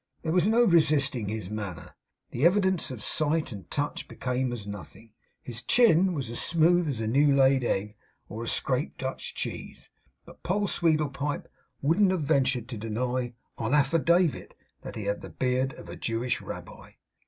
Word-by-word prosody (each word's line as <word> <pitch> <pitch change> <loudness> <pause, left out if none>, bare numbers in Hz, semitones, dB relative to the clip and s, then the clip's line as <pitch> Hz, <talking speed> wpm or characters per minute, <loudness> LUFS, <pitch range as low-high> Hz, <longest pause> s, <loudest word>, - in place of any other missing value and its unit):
There 160 - -1
was 180 +2 +3
no 230 +2 +4
resisting 150 - +3
his 105 -3 -5
manner. 100 -5 -6 0.4
The 120 - -3
evidence 190 0 +3
of 120 -6 -7
sight 155 0 0
and 100 -4 -9
touch 145 0 -3
became 125 0 -2
as 115 -4 -5
nothing. 105 +2 -10 0.3
His 120 -1 -6
chin 190 - +4
was 135 -5 -3
as 120 - -1
smooth 170 0 +3
as 120 -5 -2
a - - -1
new 140 +4 +4
laid 135 -1 +4
egg 105 -2 -1 0.3
or 110 +3 -7
a 115 - -5
scraped 130 +4 -1
Dutch 130 0 -5
cheese; - - -6 0.3
but - - -15
Poll 200 +3 0
Sweedlepipe 150 -4 0 0.4
wouldn't 170 +7 +4
have 185 -4 0
ventured 130 -4 +1
to 115 -5 -6
deny, 120 +3 -2 0.3
on 120 +5 +1
affidavit, 165 +3 +2 0.3
that - - -8
he 110 - -4
had 100 0 -2
the - - -8
beard 130 +1 0
of - - -12
a - - -7
Jewish 115 +2 -2
rabbi. - - -9
135 Hz, 170 wpm, -27 LUFS, 115-160 Hz, 0.4 s, no